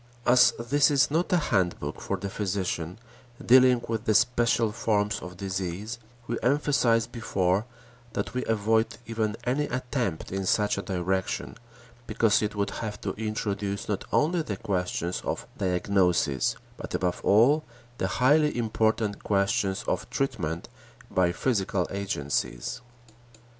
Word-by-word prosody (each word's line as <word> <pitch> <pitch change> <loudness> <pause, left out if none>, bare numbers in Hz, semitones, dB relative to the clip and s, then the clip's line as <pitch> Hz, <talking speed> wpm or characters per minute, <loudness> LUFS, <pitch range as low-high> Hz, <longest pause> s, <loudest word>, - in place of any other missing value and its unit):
As 125 +1 +6
this 135 +5 +3
is 140 -1 +3
not 165 +4 0
a 180 - +5
handbook 95 - -1
for - - -2
the 100 - -5
physician, 95 -4 -2 0.5
dealing 125 -1 +6
with 115 0 -3
the 110 - +2
special 120 -2 +3
forms 105 -1 0
of 90 0 -9
disease, 95 +4 -4 0.3
we 120 - -3
emphasized 125 -4 +2
before 100 -3 0 0.5
that - - -3
we 125 - -1
avoid 110 +1 +1
even 110 -2 -1
any 135 +5 0
attempt 125 - -3
in 95 0 -2
such 105 0 +2
a - - -2
direction 95 0 -2 0.5
because 110 -3 +3
it 105 0 -2
would 100 -1 -1
have 105 -2 -5
to - - -2
introduce 105 -2 -3
not 100 -3 -2
only 165 +3 +2
the 105 -10 -4
questions 90 -3 -2
of - - -3
diagnosis, 90 -6 +1 0.2
but - - -5
above 90 -1 -1
all 125 +10 +5 0.4
the - - +1
highly 150 +2 +3
important 110 -2 0
questions 100 -1 +1
of - - -2
treatment 90 - -2 0.4
by 90 -2 +3
physical 95 -4 0
agencies. 70 - -2
105 Hz, 135 wpm, -27 LUFS, 95-120 Hz, 0.5 s, As